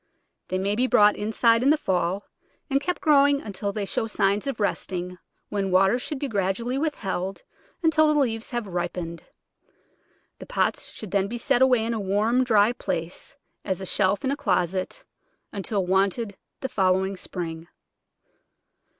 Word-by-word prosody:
They 185 - -1
may 195 +2 0
be 250 +4 +1
brought 210 -3 +5
inside 230 +2 +2
in 265 - +3
the 310 - +5
fall, 185 - -1 0.5
and 275 +1 +2
kept 360 +5 -2
growing 285 -4 +5
until 205 -3 -4
they 205 0 -3
show 225 - -2
signs 200 +1 +1
of 270 -5 -3
resting, 180 -3 -2 0.3
when 200 -2 -1
water 195 +5 +4
should 295 +3 -4
be 280 - -2
gradually 210 +3 -1
withheld 195 - -3 0.4
until 310 -1 +4
the 300 - +2
leaves 225 -4 -1
have 240 -3 -3
ripened. 175 -2 -4 1.2
The - - -10
pots - - -1
should 215 -4 -9
then 200 -1 +1
be 240 +4 -4
set 240 +1 +1
away 250 -4 +4
in 230 - -1
a 225 - -2
warm, 210 +6 +2
dry 220 -2 +4
place 170 0 -4
— - - -48
as 190 -2 -2
a 190 - -5
shelf 195 +5 +1
in 265 - +1
a - - 0
closet 185 - -1 0.2
— - - -47
until 200 -1 -2
wanted 195 +3 +1 0.3
the 265 - -3
following 190 -2 +1
spring. 170 -3 -6
205 Hz, 165 wpm, -25 LUFS, 190-245 Hz, 1.2 s, brought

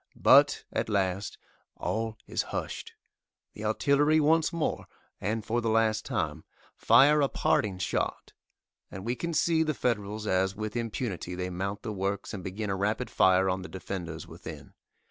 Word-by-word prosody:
But, - - +5
at - - -1
last, 95 -1 -1 0.4
all 110 0 -2
is - - -1
hushed! - - -5 0.6
The 105 - -7
artillery 140 +7 +3
once 160 +2 +3
more, 170 -3 -2 0.3
and 110 +2 -2
for 120 +2 0
the 115 - 0
last 110 -1 +2
time, - - -2 0.3
fire 150 +2 +5
a 140 - +2
parting 100 -3 +1
shot, 90 - -2 0.6
and 95 +1 -8
we 120 +2 0
can 170 +4 -3
see 160 +1 +3
the 155 -2 0
Federals 105 -3 -2
as 95 -1 +1
with 110 +1 -5
impunity 110 -6 -3
they 90 0 -3
mount 100 +3 -4
the 110 -3 -3
works 100 +2 -3
and 95 -3 -6
begin 100 +2 -3
a - - 0
rapid 105 +5 -1
fire 95 0 +4
on 95 0 0
the 95 - -8
defenders 90 -4 -6
within. - - -10
105 Hz, 165 wpm, -29 LUFS, 95-120 Hz, 0.6 s, But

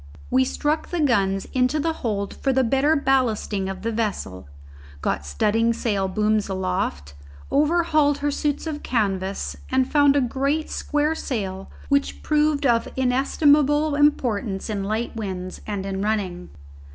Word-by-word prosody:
We 260 0 +4
struck 295 +4 -1
the 350 - -2
guns 195 -9 +2
into 255 +4 +2
the 325 +2 0
hold 200 -4 -2
for 270 - 0
the 265 0 +2
better 270 +6 +2
ballasting 235 -8 0
of 190 0 -6
the 230 - -1
vessel, 200 - -3 0.5
got 70 - -2
studding 225 - +1
sail 205 -4 -1
booms 210 +2 0
aloft, 185 - -2 0.4
overhauled 305 -1 +3
her 290 0 -1
suits 290 +1 -1
of 305 -2 -4
canvas 195 -5 -1
and 260 0 +2
found 285 -1 +4
a 285 - +4
great 275 +5 -1
square 300 +1 0
sail 195 -11 -4 0.2
which 280 0 0
proved 300 -1 +2
of 235 -3 +3
inestimable 290 +3 +3
importance 240 -9 +1
in 200 -2 -2
light 220 +4 -2
winds 185 -4 -5
and 200 -2 -3
in 195 0 -3
running. 200 - -2
235 Hz, 145 wpm, -23 LUFS, 195-290 Hz, 0.5 s, We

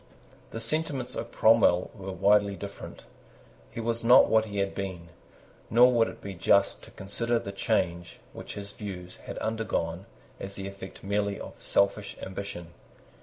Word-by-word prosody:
The 115 - -6
sentiments 135 +1 -1
of - - -5
Cromwell 110 -5 +4
were 95 -3 -7
widely 100 +2 +3
different. 100 0 -9 0.7
He - - -8
was 115 0 -1
not 125 +2 +8
what 110 0 +3
he 100 -2 -6
had 100 0 0
been; 95 -4 -5 0.6
nor 120 +3 +7
would 115 -1 +4
it - - -9
be 100 - -6
just 100 +2 +3
to - - -14
consider 115 +5 -2
the 100 - -4
change 85 -3 -1 0.2
which - - -8
his 100 0 -7
views 90 -3 -7
had - - -6
undergone 100 -5 -2 0.3
as 95 0 -6
the 95 0 -5
effect 100 -1 -10
merely 100 0 -1
of - - -10
selfish 100 +1 +1
ambition. 95 -3 -6
100 Hz, 160 wpm, -28 LUFS, 95-110 Hz, 0.7 s, not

